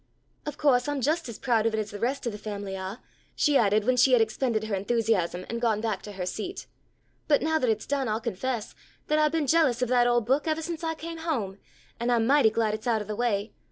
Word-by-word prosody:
"Of 295 Hz, 0 st, -4 dB
co'se 255 Hz, -4 st, +3 dB
I'm 290 Hz, -1 st, -1 dB
just 310 Hz, +2 st, 0 dB
as 230 Hz, -, -7 dB
proud 230 Hz, -3 st, +1 dB
of 220 Hz, -, 0 dB
it -, -, -1 dB
as 210 Hz, -1 st, -4 dB
the 205 Hz, -, -7 dB
rest 260 Hz, +5 st, -1 dB
of 235 Hz, -, -1 dB
the 210 Hz, -, -8 dB
family 200 Hz, -2 st, -5 dB
are," 190 Hz, +4 st, -6 dB, 0.3 s
she 295 Hz, -2 st, +2 dB
added 210 Hz, -3 st, +3 dB
when 255 Hz, +1 st, +2 dB
she 260 Hz, +1 st, +5 dB
had 245 Hz, -, +6 dB
expended 225 Hz, 0 st, 0 dB
her 220 Hz, -1 st, -4 dB
enthusiasm 195 Hz, -4 st, 0 dB
and 235 Hz, 0 st, -4 dB
gone 225 Hz, -3 st, +2 dB
back 215 Hz, -3 st, -2 dB
to 205 Hz, -, -9 dB
her 185 Hz, -2 st, -4 dB
seat, 220 Hz, -, -5 dB, 0.6 s
"but 290 Hz, -2 st, +3 dB
now 315 Hz, 0 st, +2 dB
that 255 Hz, -, +1 dB
it's 215 Hz, -1 st, 0 dB
done 275 Hz, -2 st, -1 dB
I'll 215 Hz, 0 st, 0 dB
confess 235 Hz, +1 st, -3 dB, 0.4 s
that 305 Hz, 0 st, +3 dB
I've 305 Hz, -1 st, +3 dB
been 320 Hz, -2 st, 0 dB
jealous 270 Hz, -5 st, +3 dB
of 250 Hz, -, -1 dB
that 245 Hz, -1 st, +4 dB
old 240 Hz, -2 st, +2 dB
book 270 Hz, +5 st, +1 dB
evah 315 Hz, +1 st, 0 dB
since 335 Hz, 0 st, -5 dB
I 325 Hz, 0 st, -1 dB
came 330 Hz, +1 st, -7 dB
home, 230 Hz, -, -2 dB, 0.4 s
and 240 Hz, +1 st, 0 dB
I'm 230 Hz, -2 st, +3 dB
mighty 275 Hz, -2 st, +5 dB
glad 220 Hz, -1 st, 0 dB
it's 215 Hz, +2 st, -5 dB
out 220 Hz, -3 st, +1 dB
of -, -, -15 dB
the 210 Hz, -, -3 dB
way. 215 Hz, -2 st, -1 dB
235 Hz, 255 wpm, -27 LUFS, 215-280 Hz, 0.6 s, had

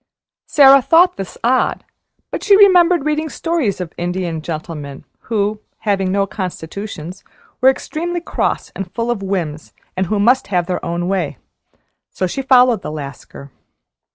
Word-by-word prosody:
Sara 275 Hz, -1 st, +7 dB
thought 335 Hz, +7 st, +4 dB
this 195 Hz, -2 st, -7 dB
odd, 255 Hz, +2 st, +1 dB, 0.5 s
but -, -, -4 dB
she 400 Hz, -2 st, +6 dB
remembered 360 Hz, -5 st, +5 dB
reading 305 Hz, +1 st, -1 dB
stories 310 Hz, -, -1 dB
of 180 Hz, -3 st, -6 dB
Indian 175 Hz, -2 st, -3 dB
gentlemen 155 Hz, -3 st, -7 dB, 0.2 s
who, 210 Hz, -1 st, -1 dB, 0.2 s
having 195 Hz, -3 st, 0 dB
no 200 Hz, 0 st, +1 dB
constitutions, 185 Hz, -2 st, -6 dB, 0.4 s
were 260 Hz, -, +7 dB
extremely 340 Hz, +6 st, -3 dB
cross 345 Hz, -, -2 dB
and 195 Hz, -2 st, -6 dB
full 235 Hz, 0 st, -1 dB
of 225 Hz, -4 st, -3 dB
whims, 170 Hz, -6 st, -4 dB, 0.2 s
and 185 Hz, 0 st, -1 dB
who 210 Hz, +3 st, 0 dB
must 245 Hz, +6 st, +3 dB
have 180 Hz, -3 st, 0 dB
their 180 Hz, 0 st, -3 dB
own 170 Hz, +1 st, -2 dB
way. 180 Hz, -8 st, -2 dB, 0.7 s
So 185 Hz, -, -2 dB
she 185 Hz, +9 st, -3 dB
followed 250 Hz, -5 st, +4 dB
the -, -, -6 dB
Lascar. 140 Hz, -1 st, -9 dB
200 Hz, 150 wpm, -18 LUFS, 175-265 Hz, 0.7 s, Sara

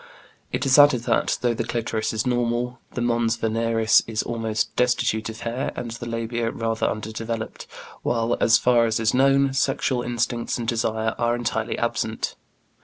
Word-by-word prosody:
It -, -, -1 dB
is 135 Hz, +2 st, +5 dB
added 145 Hz, -4 st, +6 dB
that, -, -, +1 dB
though 120 Hz, -1 st, +2 dB
the 115 Hz, -, -2 dB
clitoris 115 Hz, -1 st, -2 dB
is 110 Hz, -1 st, -2 dB
normal, 120 Hz, 0 st, -1 dB, 0.2 s
the 125 Hz, -, -2 dB
mons 120 Hz, -1 st, +1 dB
veneris 115 Hz, 0 st, +2 dB
is 110 Hz, -1 st, -1 dB
almost 115 Hz, -2 st, -2 dB
destitute 120 Hz, -3 st, +1 dB
of 110 Hz, +1 st, -8 dB
hair, 120 Hz, +4 st, -2 dB
and 120 Hz, -2 st, -5 dB
the 120 Hz, +1 st, -7 dB
labia 115 Hz, 0 st, -2 dB
rather 115 Hz, 0 st, -1 dB
undeveloped, 110 Hz, +1 st, -4 dB, 0.3 s
while, 115 Hz, 0 st, 0 dB
"as 115 Hz, 0 st, +6 dB
far 120 Hz, -2 st, +3 dB
as 110 Hz, 0 st, 0 dB
is 115 Hz, -1 st, +1 dB
known," 135 Hz, +1 st, +3 dB
sexual 135 Hz, -2 st, 0 dB
instincts 120 Hz, 0 st, -2 dB
and 120 Hz, -2 st, -4 dB
desire 110 Hz, -1 st, 0 dB
are 120 Hz, 0 st, +2 dB
entirely 120 Hz, -2 st, -2 dB
absent. -, -, -2 dB
115 Hz, 165 wpm, -23 LUFS, 115-120 Hz, 0.3 s, added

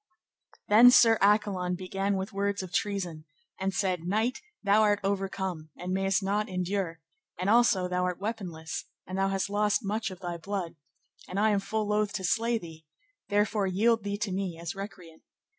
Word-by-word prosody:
Then 225 Hz, +4 st, +8 dB
Sir 230 Hz, -3 st, +6 dB
Accolon 195 Hz, -3 st, +2 dB
began 195 Hz, +2 st, -2 dB
with 190 Hz, +3 st, -4 dB
words 200 Hz, 0 st, -1 dB
of 180 Hz, -2 st, -9 dB
treason, 180 Hz, -6 st, -2 dB, 0.3 s
and 190 Hz, +1 st, 0 dB
said, 185 Hz, -3 st, -1 dB
Knight, 220 Hz, +8 st, 0 dB, 0.2 s
thou 205 Hz, +1 st, +4 dB
art 205 Hz, -1 st, +3 dB
overcome, 190 Hz, -4 st, -2 dB
and 180 Hz, +1 st, -4 dB
mayst 195 Hz, +1 st, +1 dB
not 205 Hz, +2 st, 0 dB
endure, 180 Hz, -2 st, -2 dB, 0.4 s
and 185 Hz, +3 st, +1 dB
also 220 Hz, -6 st, +4 dB
thou 180 Hz, 0 st, 0 dB
art 180 Hz, -1 st, -2 dB
weaponless, 185 Hz, -7 st, -5 dB, 0.2 s
and 185 Hz, -, -6 dB
thou 195 Hz, -, +2 dB
hast 195 Hz, 0 st, -1 dB
lost 210 Hz, +1 st, +1 dB
much 220 Hz, +2 st, -1 dB
of 185 Hz, -2 st, -10 dB
thy 175 Hz, -2 st, -4 dB
blood, 185 Hz, -1 st, -4 dB, 0.5 s
and 185 Hz, -, -3 dB
I 215 Hz, +1 st, +4 dB
am 205 Hz, -, +2 dB
full 215 Hz, +2 st, -2 dB
loath 210 Hz, -1 st, +1 dB
to 195 Hz, -, -3 dB
slay 230 Hz, +5 st, +1 dB
thee, 165 Hz, -5 st, -10 dB, 0.5 s
therefore 205 Hz, 0 st, +1 dB
yield 220 Hz, +4 st, +2 dB
thee 205 Hz, 0 st, -2 dB
to 210 Hz, -2 st, -2 dB
me 185 Hz, -3 st, -3 dB
as 170 Hz, -1 st, -4 dB
recreant. 180 Hz, -5 st, -9 dB
195 Hz, 175 wpm, -28 LUFS, 180-210 Hz, 0.5 s, Then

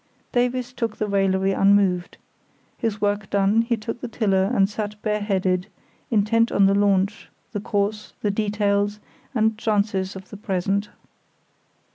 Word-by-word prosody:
Davies 245 Hz, 0 st, 0 dB
took 230 Hz, -3 st, -3 dB
the 215 Hz, -, -1 dB
raillery 195 Hz, -1 st, +2 dB
unmoved. 195 Hz, -2 st, +2 dB, 0.6 s
His 220 Hz, -4 st, -2 dB
work 205 Hz, -1 st, -1 dB
done, 200 Hz, +3 st, +3 dB
he 235 Hz, 0 st, 0 dB
took 230 Hz, +2 st, -6 dB
the 245 Hz, -, -4 dB
tiller 195 Hz, -5 st, +1 dB
and 195 Hz, -, +3 dB
sat 210 Hz, 0 st, -5 dB
bareheaded, 195 Hz, -3 st, 0 dB, 0.4 s
intent 230 Hz, +2 st, +2 dB
on 200 Hz, -, +4 dB
the 195 Hz, -, +4 dB
launch, 200 Hz, 0 st, +1 dB, 0.2 s
the 205 Hz, -, -3 dB
course, 210 Hz, 0 st, -2 dB
the 205 Hz, -, +2 dB
details, 205 Hz, 0 st, 0 dB, 0.4 s
and 220 Hz, -1 st, +2 dB
chances 200 Hz, -3 st, 0 dB
of 190 Hz, 0 st, -10 dB
the 205 Hz, -, -8 dB
present. 200 Hz, 0 st, -1 dB
205 Hz, 140 wpm, -23 LUFS, 195-215 Hz, 0.6 s, on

